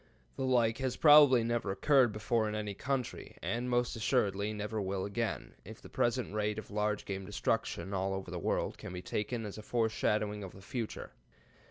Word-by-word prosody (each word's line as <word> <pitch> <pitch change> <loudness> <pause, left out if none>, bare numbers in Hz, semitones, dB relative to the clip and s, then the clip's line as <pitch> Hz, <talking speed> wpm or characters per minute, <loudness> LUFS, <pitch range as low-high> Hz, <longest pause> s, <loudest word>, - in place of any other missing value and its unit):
The 135 - -2
like 115 -3 +2
has 130 -1 -1
probably 145 -5 +7
never 115 -3 -1
occurred 130 +3 +4
before 110 +1 0
in 105 - -3
any 105 -1 -3
country, 130 +4 -3
and 120 +2 -1
most 120 0 +1
assuredly 105 -3 +1
never 105 0 -3
will 95 -1 -2
again, 115 +3 -3
if - - -10
the - - -13
present 120 -3 0
rate 105 0 -1
of 110 - -7
large 105 0 -1
game 95 -1 -4
destruction 100 0 -2
all 95 0 0
over 95 -1 -6
the 90 - -4
world - - -1
can 90 - -7
be 90 0 -6
taken 110 +4 -2
as 105 +1 -7
a - - -6
foreshadowing 105 -2 0
of 95 - -8
the 95 - -13
future. 115 +1 -5
105 Hz, 190 wpm, -32 LUFS, 100-120 Hz, -, probably